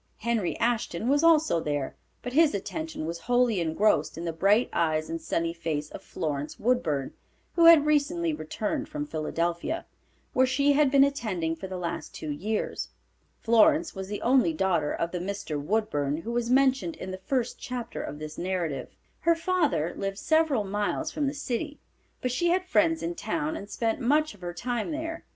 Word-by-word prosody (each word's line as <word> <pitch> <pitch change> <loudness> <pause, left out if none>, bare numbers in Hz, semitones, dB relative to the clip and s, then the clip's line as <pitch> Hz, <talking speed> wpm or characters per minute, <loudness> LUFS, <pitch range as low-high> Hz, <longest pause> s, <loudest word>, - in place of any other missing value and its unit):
Henry 225 -5 -1
Ashton 235 -4 0
was 290 +3 +3
also 315 - +5
there, 145 -3 -2 0.3
but 245 - -5
his 310 -5 +4
attention 315 - -4
was 170 +1 -4
wholly 245 +1 +2
engrossed 160 -1 +1
in 170 - -5
the 165 - -2
bright 200 +8 +3
eyes 155 -1 0
and 165 0 -3
sunny 165 +1 -1
face 155 -3 -3
of - - -8
Florence 145 -1 -4
Woodburn, 170 - 0 0.4
who 335 - +4
had 330 -3 +9
recently 305 +3 +1
returned 280 - -3
from 300 -1 -3
Philadelphia, 170 - -2 0.5
where 260 0 +4
she 280 +2 +3
had 290 -1 +4
been 275 0 +6
attending 210 -13 -1
for 175 +4 -7
the 185 -1 -5
last 170 -1 -5
two 155 - -5
years. 210 +9 -2 0.5
Florence 305 +8 +4
was 190 -1 -6
the 205 +1 -5
only 245 -9 +4
daughter 165 -3 +1
of 170 - -2
the 180 - -3
Mr. 185 -5 -4
Woodburn, 150 -6 0
who 195 +8 -5
was 235 0 -1
mentioned 270 +4 +3
in 185 - -6
the 185 - -6
first 250 +4 -2
chapter 245 -2 -5
of 150 - -6
this 155 0 -7
narrative. 170 -8 -2 0.3
Her 335 0 +3
father 320 - 0
lived 195 0 -3
several 315 -4 +2
miles 205 +10 -2
from 295 -2 -1
the 275 - -1
city, 285 +2 -3 0.4
but 250 - -1
she 305 +8 +1
had 365 +2 +2
friends 325 -3 +2
in 335 - -2
town 315 -2 -2
and 200 -9 -7
spent 225 +2 -1
much 300 +4 +2
of 205 - -19
her 175 -1 -5
time 240 - -2
there. 325 +1 -4
225 Hz, 180 wpm, -27 LUFS, -, 0.5 s, had